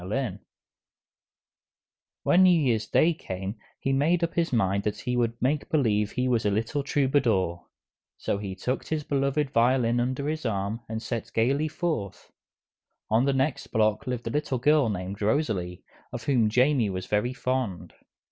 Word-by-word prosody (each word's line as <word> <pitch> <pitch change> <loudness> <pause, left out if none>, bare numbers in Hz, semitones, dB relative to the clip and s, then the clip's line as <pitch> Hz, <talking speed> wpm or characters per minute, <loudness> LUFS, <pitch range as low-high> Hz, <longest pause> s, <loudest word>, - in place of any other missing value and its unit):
When 180 - +4
New 185 - +7
Year's 115 -7 +1
Day 170 +2 +3
came 95 - -6 0.2
he 135 - 0
made 165 +6 +2
up 165 - -1
his 170 -1 0
mind 100 -4 +1
that 105 0 -3
he 125 - -2
would 120 -1 0
make 145 +3 0
believe 105 -9 +1
he 125 0 0
was 120 -3 +1
a 105 - +2
little 110 +8 -1
troubadour. 125 - +1 0.5
So 100 - -2
he 100 -2 -5
tucked 125 +7 -3
his 155 -1 -2
beloved 140 0 0
violin 120 0 +3
under 130 +3 -1
his 155 +1 -2
arm 105 -1 -2
and 110 0 -4
set 115 0 -4
gaily 135 +7 +2
forth. 155 - -4 0.8
On 115 +4 +4
the 140 - +2
next 135 +1 -1
block 110 +3 +1
lived 125 -2 -3
a 115 - -2
little 145 -2 -1
girl 145 0 +3
named 100 0 -4
Rosalie, 105 - -1 0.3
of - - -6
whom 120 -6 +2
Jamie 125 -1 +3
was 95 -1 -4
very 105 +5 0
fond. 125 -9 -2
125 Hz, 160 wpm, -26 LUFS, 105-140 Hz, 0.8 s, New